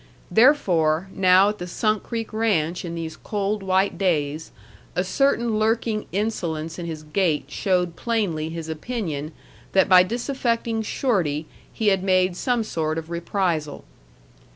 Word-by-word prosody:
Therefore, 190 - +3
now 190 +1 +5
at 210 - -5
the 180 - -5
Sunk 215 +3 0
Creek 225 -2 -5
Ranch 180 -7 0
in 170 -1 -5
these 165 -1 -5
cold 205 0 -2
white 190 +1 +1
days, 155 -4 0 0.5
a 180 - +1
certain 235 0 +1
lurking 220 0 0
insolence 170 -6 -2
in 170 - -5
his 155 -2 -6
gait 155 -3 0
showed 180 0 0
plainly 190 -10 -1
his 165 -1 -6
opinion 160 - -4 0.4
that 190 - +4
by 185 -1 +8
disaffecting 235 +1 -1
Shorty 180 - 0 0.3
he 220 -2 +1
had 195 -2 +2
made 185 -1 +2
some 245 +3 0
sort 160 -6 -2
of 165 +1 -6
reprisal. 170 -3 -2
185 Hz, 140 wpm, -23 LUFS, 160-215 Hz, 0.5 s, by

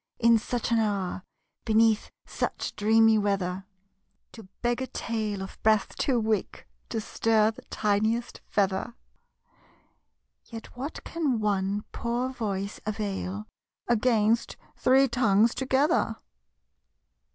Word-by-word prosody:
In 230 -1 +5
such 240 +1 -3
an 230 - +4
hour 200 -4 -1 0.4
Beneath 220 -1 +3 0.2
such - - -3
dreamy 220 +1 +4
weather, 195 -2 -1 0.7
To 220 -5 -12 0.2
beg 240 +1 +1
a 260 - -2
tale 215 -6 -3
of 190 - -10
breath 215 -2 +2
too 255 -4 +1
weak 220 -2 -2 0.2
To 225 - -2
stir 220 0 +2
the 225 - -13
tiniest 220 +3 -1
feather&xclm. 200 +3 0 1.5
Yet 225 -2 -10
what 270 +5 -6
can 295 -8 -1
one 200 -1 0
poor 240 +2 -2
voice 205 -5 -4
avail 205 -1 -3 0.4
Against 230 -1 +2 0.2
three 265 +2 +4
tongues 230 -2 +3
together? 265 -2 +1
220 Hz, 110 wpm, -27 LUFS, 205-240 Hz, 1.5 s, In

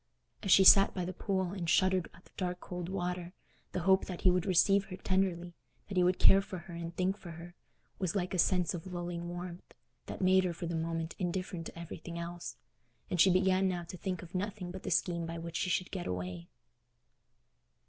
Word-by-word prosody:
As 195 - -4
she 195 - +8
sat 195 +1 +8
by 180 -2 -2
the 185 - -4
pool 190 -1 -1
and 175 -4 -3
shuddered 185 -1 +3
at 180 - -19
the - - -21
dark 180 -1 -3
cold 180 -1 -6
water, 180 -2 -3 0.4
the 180 - -2
hope 190 +2 +4
that 180 -2 -6
he 185 - +5
would 180 +1 0
receive 195 +2 +4
her 185 - -8
tenderly—that 185 0 -3
he 180 - +4
would 180 +1 +3
care 195 - +6
for 190 -1 -7
her 175 0 -10
and 170 0 -6
think 185 +2 0
for 180 - -11
her—was 175 +1 -8
like 185 -2 -1
a 185 - 0
sense 180 -1 +2
of 175 +1 -6
lulling 175 -1 -4
warmth, 175 0 -8 0.3
that - - -6
made 185 0 +4
her 180 -2 -1
for 170 - -6
the 170 - -3
moment 165 0 -2
indifferent 180 -2 -3
to - - -11
everything 170 0 -7
else; 170 +1 -6 0.6
and 180 - +3
she 190 - +7
began 185 +1 +3
now 180 -2 -2
to 170 +2 -9
think 180 -1 -4
of 170 - -13
nothing 190 -1 -3
but 190 +1 -7
the - - -5
scheme 170 -2 0
by 165 0 -5
which 165 0 -7
she 185 - -1
should 180 0 0
get 185 -3 -4
away. 90 -1 -4
180 Hz, 210 wpm, -32 LUFS, 170-185 Hz, 0.6 s, she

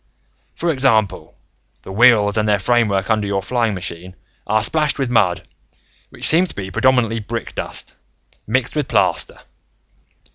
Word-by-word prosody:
"For 170 0 -1
example, 120 - 0 0.5
the - - -9
wheels 105 -1 +4
and 110 -1 0
their 105 -1 +3
framework 105 -2 0
under 105 -2 0
your 100 -1 -2
flying 115 -2 -1
machine 90 0 -7 0.3
are 110 +1 +1
splashed 150 +2 +1
with 135 -3 -2
mud 95 -7 +1 0.6
which - - 0
seems 175 +3 +4
to - - -9
be 95 -1 -6
predominantly 120 0 +1
brick 115 +2 -6
dust, - - -6 0.5
mixed 125 +4 -1
with 150 -3 -1
plaster. - - 0
110 Hz, 145 wpm, -19 LUFS, 100-125 Hz, 0.6 s, wheels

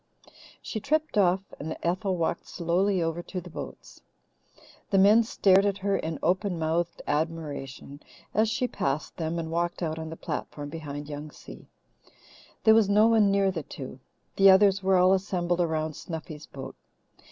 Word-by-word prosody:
She 220 - -4
tripped 310 +7 0
off, 190 -2 +3 0.2
and 160 +2 -5
Ethel 185 +2 0
walked 170 0 -2
slowly 180 +2 0
over 165 +1 -2
to 180 +1 -6
the 180 -1 -11
boats. - - -9 0.9
The 195 - +2
men 205 +4 +7
stared 195 -4 +4
at 200 -1 0
her 200 0 0
in 160 -3 -3
open 185 +1 +1
mouthed 165 +1 -1
admiration 145 -3 -4 0.3
as 220 +1 +3
she 240 +3 0
passed 140 - -3
them 165 0 -2
and 160 -1 -4
walked 175 +1 -1
out 160 -1 -2
on 160 0 -5
the 160 - -6
platform 145 -2 -5
behind 145 -2 -6
Young 150 +1 -6
Si. - - -13 1.0
There 220 - +7
was 220 -3 +4
no 210 +2 +5
one 220 -3 +4
near 195 -1 +2
the 170 -3 -4
two. 130 -2 -9 0.4
The 195 0 +7
others 195 0 +5
were 190 0 +3
all 185 +1 +5
assembled 180 -2 0
around 155 -2 -1
Snuffy's 155 -2 -8
boat. 135 - -9
175 Hz, 165 wpm, -27 LUFS, 160-195 Hz, 1.0 s, men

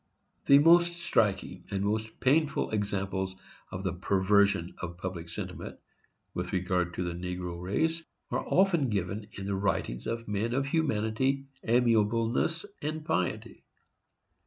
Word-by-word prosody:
The 140 - +9
most 170 +3 +6
striking 100 - 0
and 100 -1 -1
the - - 0
most 110 +1 -2
painful 150 +3 +2
examples 100 -2 -2 0.3
of 95 +1 -6
the 95 -3 -1
perversion 95 -1 +2
of 85 -1 -5
public 90 -2 -5
sentiment, - - -6 0.6
with 90 +1 -4
regard 90 -1 0
to 90 - -1
the 85 -1 -3
negro 90 0 -5
race, 160 - 0 0.3
are - - 0
often 175 -8 +3
given 100 +1 -2
in 100 - -6
the 100 - -1
writings 95 -11 -1
of 115 0 -3
men 105 +4 -1
of 135 +1 +1
humanity, 135 -2 0 0.2
amiableness 115 - +2 0.2
and 155 +1 -3
piety. 90 - -2
105 Hz, 135 wpm, -29 LUFS, 95-135 Hz, 0.6 s, The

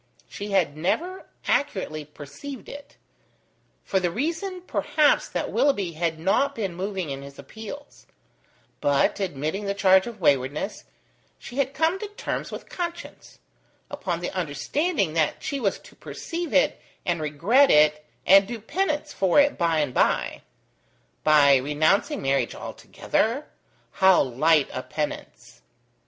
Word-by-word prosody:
She 205 +1 -7
had 185 -7 +1
never 335 - -2 0.2
accurately 190 - -1
perceived 220 - -10
it: 285 0 -11 0.9
for 190 - 0
the 180 -1 0
reason 335 - -3
perhaps 305 -4 +2
that - - -3
Willoughby 205 -11 +1
had 165 0 -2
not 200 - +1
been 195 -6 -3
moving 185 -3 -4
in 135 0 -5
his 140 0 -11
appeals: 225 +7 -10 0.7
but, 145 +7 +2
admitting 180 +2 -3
the 200 0 -1
charge 190 0 +4
of 230 -3 -8
waywardness, 145 +3 0 0.5
she 245 - -10
had 275 0 0
come 325 +4 +1
to 425 - -5
terms 415 - -5
with - - -8
conscience, 345 -1 -7 0.5
upon 185 -13 -3
the 175 - -3
understanding 190 - -1
that 160 -2 0
she 280 - -2
was 205 -6 0
to - - -17
perceive 335 -1 -6
it - - +2 0.2
and 170 -2 0
regret 180 - +3
it 150 0 +4 0.2
and 195 +1 +7
do 235 -1 -5
penance 300 - -2
for 190 +6 +3
it 285 0 +4
by 165 -2 +1
and 140 -4 -2
by: - - +1 0.8
by 145 -3 +6
renouncing 155 - +1
marriage 135 -3 0
altogether? 255 +7 -2 0.4
How 190 -1 +5
light 145 +4 +3
a 130 - -3
penance! 150 - -6
190 Hz, 140 wpm, -25 LUFS, -, 0.9 s, and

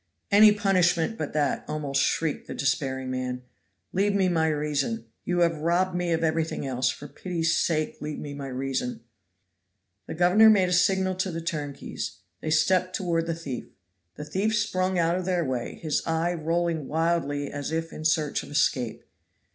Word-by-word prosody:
"Any 210 +1 +8
punishment 190 -2 +2
but 155 -8 -4
that," 145 -2 0
almost 140 -2 -1
shrieked 160 0 0
the - - -6
despairing 130 -1 -1
man. 125 0 -3 0.5
"Leave 200 +2 +2
me 190 -2 +3
my 160 -2 +2
reason. 145 -7 -1 0.2
You 175 0 +1
have 165 -2 +2
robbed 175 +4 +1
me 175 -1 -1
of 165 0 +1
everything 160 -2 0
else. 130 -1 0
For 145 - -6
pity's 165 0 -1
sake 155 -1 0
leave 150 0 -4
me 145 -1 -6
my 140 -1 -6
reason!" 130 -2 -3 1.1
The - - -5
governor 180 +6 +6
made 190 -4 +4
a - - 0
signal 190 +1 +3
to 185 +1 0
the 165 -2 -4
turnkeys; 150 -4 -5 0.2
they 155 - -3
stepped 185 +3 +2
toward 165 -3 0
the 165 - -1
thief. 145 -7 -6 0.5
The 150 - -7
thief 205 +7 0
sprung 185 -3 0
out 170 +1 +2
of 185 - -3
their 180 -3 +1
way, 125 -3 -3
his 155 -3 -1
eye 165 +2 +1
rolling 165 -2 -1
wildly 155 -3 0
as 145 +1 -4
if 165 0 -2
in 155 - -7
search 155 -2 +1
of - - -11
escape. 130 -5 0
165 Hz, 175 wpm, -26 LUFS, 145-180 Hz, 1.1 s, Any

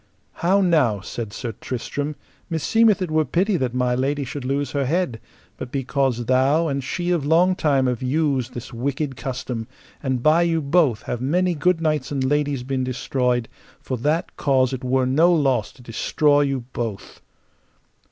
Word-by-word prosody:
How 190 +4 +3
now, 145 - +2
said 110 +1 -6
Sir 115 +3 -5
Tristram, 145 +4 -4 0.3
meseemeth 210 +5 +3
it 175 - -4
were 155 0 +3
pity 185 - +1
that 125 -4 -2
my 125 -1 +1
lady 140 +3 0
should 140 +1 -6
lose 140 +2 -1
her 140 -2 -1
head, 150 -7 -1 0.4
but 125 - -7
because 135 -3 -1
thou 135 +7 +3
and 140 -2 -2
she 175 +6 -2
of 170 -5 +1
long 170 +5 +3
time 140 -6 +2
have 125 -2 -1
used 130 -2 0
this 120 - -7
wicked 135 +3 -2
custom, 125 -3 -4 0.3
and 130 -3 -1
by 155 +2 +5
you 165 -1 +2
both 140 -6 +2
have 120 - -4
many 175 +7 +1
good 165 +2 +1
knights 155 -2 0
and 135 -2 -1
ladies 145 -1 0
been 130 0 -2
destroyed, 125 -1 -1 0.3
for 130 - -4
that 150 +8 -1
cause 130 -2 +2
it 130 - -5
were 130 0 +1
no 155 +7 +4
loss 135 -9 +1
to 125 - -17
destroy 145 +5 +2
you 135 -2 0
both. 115 -5 -5
140 Hz, 170 wpm, -22 LUFS, 125-155 Hz, 0.4 s, by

